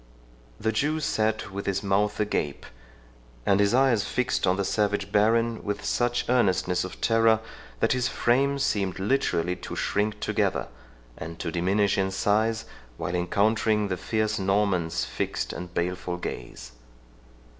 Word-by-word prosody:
The 110 - 0
Jew 145 +8 0
sat 110 -7 -1
with 100 +1 -5
his 100 0 0
mouth 100 +1 +1
agape, 90 -9 -1 0.8
and 100 0 +3
his 100 +3 +3
eyes 130 -5 +4
fixed 125 -6 0
on 90 - +3
the 100 - 0
savage 105 0 0
baron 115 +2 +2
with 105 -1 -3
such 120 0 0
earnestness 95 -7 +2
of 95 - -7
terror, 115 -1 +4 0.4
that - - +3
his 125 -1 +1
frame 140 +4 +2
seemed 100 -8 0
literally 95 -5 0
to - - -7
shrink 105 +1 -1
together, - - 0 0.5
and 80 +1 -7
to 85 - -4
diminish 95 +4 +1
in 95 0 +1
size 110 +3 +1 0.3
while 85 - -3
encountering 105 +4 +1
the 95 - 0
fierce 110 +3 -1
Norman's 95 -4 +1
fixed - - -3
and 90 0 -7
baleful 90 0 -2
gaze. 60 -7 -7
105 Hz, 145 wpm, -26 LUFS, 95-110 Hz, 0.8 s, eyes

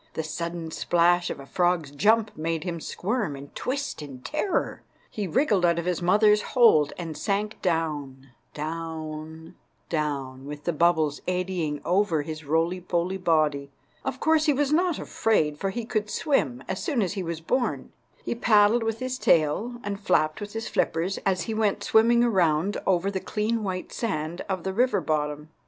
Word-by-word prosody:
The 160 - -2
sudden 170 +1 -4
splash 175 +2 +2
of - - -5
a 140 - -9
frog's 175 -2 0
jump 215 +8 +2
made 160 0 -2
him 175 -2 -3
squirm 205 - -2
and 140 +1 -11
twist 275 - -3
in 135 -4 -9
terror. 335 +6 -1 0.3
He 205 -3 -3
wriggled 210 - +2
out 170 -1 +3
of 170 - -2
his 180 -2 -1
mother's 210 +4 +4
hold, 205 - +4
and 165 -3 -5
sank 210 +3 -2
down, 145 -6 -2 0.2
down, 160 0 -6 0.4
down, 140 -4 -3
with 145 0 -7
the 175 - -1
bubbles 160 -2 +2
eddying 180 -5 -1
over 175 -4 +2
his 155 0 -6
roly 165 +5 0
poly 175 +2 -1
body. 155 -5 +1 0.3
Of 265 -1 -3
course 315 0 +3
he 295 - +5
was 285 +1 +1
not 345 0 +2
afraid, 150 -9 0
for 195 - -1
he 235 +3 -4
could 215 -2 -2
swim 135 - 0
as 190 - -3
soon 255 -8 +1
as 190 - -2
he 200 - -3
was 170 -2 -4
born. 245 +9 -1 0.3
He - - -1
paddled 220 0 +4
with 225 0 -1
his 255 +1 -4
tail 170 +10 +2
and 200 -1 -4
flapped 155 -5 +1
with 205 0 -6
his 225 +1 -4
flippers 175 +4 0
as 185 -1 +1
he 225 - -3
went 215 -2 0
swimming 235 +2 +4
around 185 -4 +2
over 190 +1 +2
the 190 - -2
clean 220 +4 -1
white 185 -2 -4
sand 170 -6 -3
of 185 -3 -2
the 190 - -2
river 250 +5 +2
bottom. 150 0 -2
175 Hz, 175 wpm, -26 LUFS, 155-215 Hz, 0.4 s, he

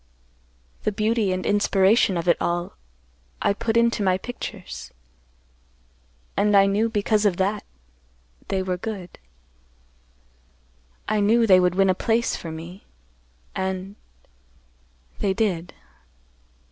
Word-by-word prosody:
The - - 0
beauty 215 -1 0
and 185 0 -2
inspiration 200 -1 +3
of 170 +1 -3
it 170 - +5
all 175 +1 -1 0.7
I - - +2
put 230 +2 -1
into 235 -1 +2
my 185 -2 +2
pictures, 215 -3 -8 1.4
and 205 0 +3
I 195 - +6
knew 205 +3 +1
because 215 0 +1
of 195 -4 +2
that 200 +2 0 0.8
they 190 -1 -1
were 185 -1 -2 2.3
good—I 215 0 0
knew 225 +3 +4
they 185 -4 +6
would 180 0 +2
win 195 0 +4
a - - +2
place 230 +5 0
for 165 - -7
me—and—they 60 - -9
did. 180 -6 -1
190 Hz, 110 wpm, -24 LUFS, 170-210 Hz, 2.3 s, I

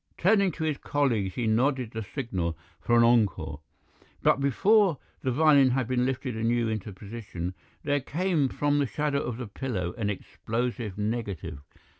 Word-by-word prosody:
Turning 200 +1 +4
to 160 - -5
his 155 -3 -1
colleagues 115 -10 0
he 120 - -1
nodded 125 +2 +1
the 110 - -4
signal 95 - -3 0.2
for 120 +8 +2
an 120 - +6
encore. 100 -11 +2 0.6
But - - +4
before 190 - +4 0.2
the 130 - -1
violin 140 0 +5
had 130 -1 0
been 125 0 +1
lifted 130 -2 -2
anew 115 +1 +1
into 110 -1 -3
position 100 -3 -6 0.3
there 145 0 +1
came 160 0 0
from 145 +2 +1
the 140 - +1
shadow 145 +1 -1
of 120 -5 -4
the 125 - -5
pillar 100 -5 -3
an 105 -2 0
explosive 110 +2 -3
negative. 105 -8 -3
120 Hz, 160 wpm, -27 LUFS, 105-140 Hz, 0.6 s, an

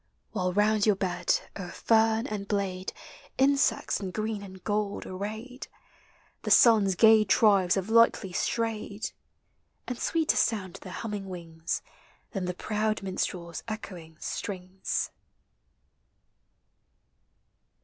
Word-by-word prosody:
While 185 -4 -1
round 210 +2 +3
your 210 - +5
bed, 185 -2 0
o'er 180 -2 -6
fern 225 +2 +2
and 205 -3 -4
blade. 195 -2 -2 0.5
Insects 270 -7 +2
in 195 -2 -4
green 215 +2 -3
and 190 -2 -11
gold 210 -1 -1
arrayed. 220 +7 -6 0.7
The - - -4
sun's 210 -5 +6
gay 220 +1 +7
tribes 200 -3 +4
have 190 0 -2
lightly 230 -4 +4
strayed; 220 0 -2 0.8
And 250 -1 -4
sweeter 325 -2 +1
sound 195 -6 0
their 185 - -9
humming 205 -1 -5
wings 165 -2 -4 0.5
Than 195 -7 -3
the 180 0 -3
proud 215 +1 -1
minstrel's 180 -3 -3
echoing 180 -7 -7
strings. 190 -2 -3
205 Hz, 110 wpm, -28 LUFS, 185-220 Hz, 0.8 s, gay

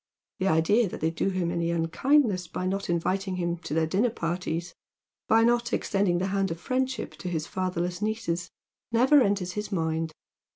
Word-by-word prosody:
The 190 - +1
idea 195 +6 +3
that - - -7
they 160 +1 +1
do 165 +4 0
him 185 -3 -1
any 170 -1 -1
unkindness 185 - +2
by 180 +2 -4
not 195 +1 -2
inviting 185 +3 0
him 175 -1 -1
to 160 -3 -5
their 160 0 +3
dinner 200 +9 +2
parties, 170 -3 -3 0.5
by 225 +1 +5
not 235 0 +2
extending 195 -3 +1
the 180 - 0
hand 195 -1 +1
of 165 - -4
fiiendship 260 +4 -1
to 180 - -5
his 160 -3 -2
fatherless 180 0 -2
nieces, 205 -5 -2 0.4
never 260 +5 +5
enters 200 -5 +1
his 210 +3 -5
mind. 160 -3 -1
185 Hz, 175 wpm, -27 LUFS, 170-210 Hz, 0.5 s, by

